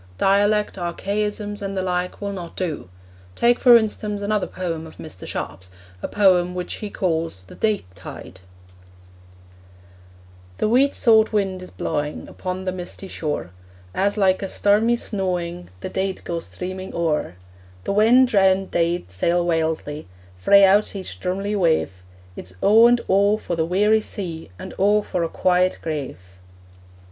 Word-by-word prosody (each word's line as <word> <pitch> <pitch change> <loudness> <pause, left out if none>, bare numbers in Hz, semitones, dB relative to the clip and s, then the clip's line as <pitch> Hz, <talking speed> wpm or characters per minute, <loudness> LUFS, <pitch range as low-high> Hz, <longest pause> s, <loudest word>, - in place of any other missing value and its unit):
Dialect, 205 +1 +2
archaisms 205 +4 -3
and 195 -1 -4
the 190 - 0
like, 180 0 -2
will 200 0 -3
not 175 -3 -8
do. 160 - -4 0.5
Take, 240 +1 +3
for 245 -2 +8
instance, 210 -2 -2
another 210 0 0
poem 165 -3 -4
of 160 - -15
Mr. 155 - -9
Sharp's, 90 +5 -5 0.3
a - - -3
poem 180 -3 +3
which 180 -1 -4
he 210 - -4
calls 165 - -2
The 90 - -14
Deith 215 - 0
Tide: 90 -1 -10 2.2
The - - +1
weet 260 +5 +3
saut 220 -2 +4
wind 195 -3 -1
is 185 - -9
blawing 150 0 -3
Upon 185 0 -5
the 185 - 0
misty 185 +1 -7
shore: 150 - -4 0.4
As, 200 +2 0
like 190 -2 +3
a 195 - -2
stormy 210 +5 +2
snawing, 180 -5 -3
The - - -4
deid 190 0 -3
go 170 -1 -3
streaming 185 +2 -6
o'er: 160 - -1 0.5
The - - -2
wan 230 +5 +6
drown'd 195 -4 +2
deid 170 - 0
sail 170 - +1
wildly 160 - -1 0.3
Frae 200 - +5
out 205 +2 +3
each 190 -2 -6
drumly 195 +3 -2
wave: 160 - +1 0.3
It's 90 - -8
O 225 +3 +7
and 240 0 +3
O 200 +2 +3
for 175 - -4
the 160 -1 0
weary 210 +5 +3
sea, 170 - -6
And - - -8
O 205 +2 +3
for 180 - -2
a 165 - -1
quiet 185 +1 +2
grave. 150 - -4
185 Hz, 155 wpm, -22 LUFS, 170-205 Hz, 2.2 s, for